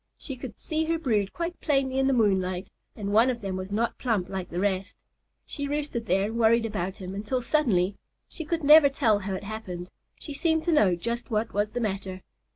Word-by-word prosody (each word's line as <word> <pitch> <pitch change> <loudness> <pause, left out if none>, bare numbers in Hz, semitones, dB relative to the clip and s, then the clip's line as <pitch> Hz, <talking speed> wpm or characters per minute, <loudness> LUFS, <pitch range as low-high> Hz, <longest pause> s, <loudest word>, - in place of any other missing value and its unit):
She 270 - -7
could 245 -4 -8
see 315 0 -1
her 330 +1 +1
brood 215 -11 0
quite 345 +1 -4
plainly 270 -3 +1
in 270 - +3
the - - +3
moonlight, 190 -5 +1 0.2
and 200 -2 -3
one 230 +4 +5
of 240 -2 -2
them 195 -2 -3
was 185 +1 -5
not 230 +3 -1
plump 215 -8 0
like 190 -2 -4
the 175 - -3
rest. 195 +1 -1 0.5
She 285 -2 -4
roosted 285 -6 -3
there 195 +2 +2
and 225 +3 -3
worried 230 0 +4
about 190 -4 -3
him 185 -2 -7
until 215 +6 -2
suddenly 220 - +1 0.3
(she 320 - -7
could 325 +1 -2
never 300 0 +8
tell 220 -6 +2
how 195 -1 -3
it 190 - -6
happened) 185 -4 -6 0.3
she 295 - -7
seemed 320 +2 +1
to 345 - +1
know 205 - +4
just 235 +7 -4
what 220 0 -1
was 205 +1 +1
the 245 - -4
matter. 195 -4 -3
220 Hz, 215 wpm, -27 LUFS, 195-270 Hz, 0.5 s, never